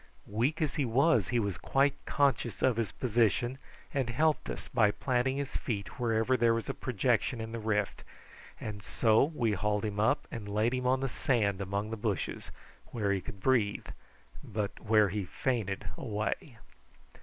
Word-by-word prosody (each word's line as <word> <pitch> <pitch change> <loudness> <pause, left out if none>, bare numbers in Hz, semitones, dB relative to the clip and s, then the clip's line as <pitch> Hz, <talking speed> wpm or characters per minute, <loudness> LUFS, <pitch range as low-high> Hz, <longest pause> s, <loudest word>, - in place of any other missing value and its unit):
Weak 120 +10 0
as 150 - -1
he 145 - +2
was 125 - +3
he 120 - 0
was 100 -5 -1
quite 135 +1 +2
conscious 135 -7 +1
of 130 -3 +4
his 115 -4 -1
position, 120 +1 +1 0.3
and 135 -4 0
helped 155 +6 +1
us - - -6
by 110 -3 +3
planting 130 +4 0
his 140 -1 -4
feet 105 0 -4
wherever 115 +1 +2
there 115 -2 +3
was 115 - -3
a - - -2
projection 125 0 0
in 110 0 -5
the 115 - -4
rift, 105 -2 -1 0.6
and 105 -1 -6
so 110 +3 +3
we 135 -7 0
hauled 105 +1 0
him 105 -1 -3
up 110 +2 +2
and 105 -3 -6
laid 110 +4 +1
him 125 0 -1
on 130 +1 +2
the 135 - 0
sand 105 -7 0
among 100 +3 -2
the 110 - -3
bushes, 105 -3 -3 0.4
where 105 -4 -1
he 95 -1 0
could 100 - -9
breathe, 115 -5 +2 0.6
but 105 -1 -3
where 105 -1 +4
he 100 +2 -2
fainted 105 -2 -2
away. 110 +2 -3
115 Hz, 175 wpm, -31 LUFS, 105-130 Hz, 0.6 s, of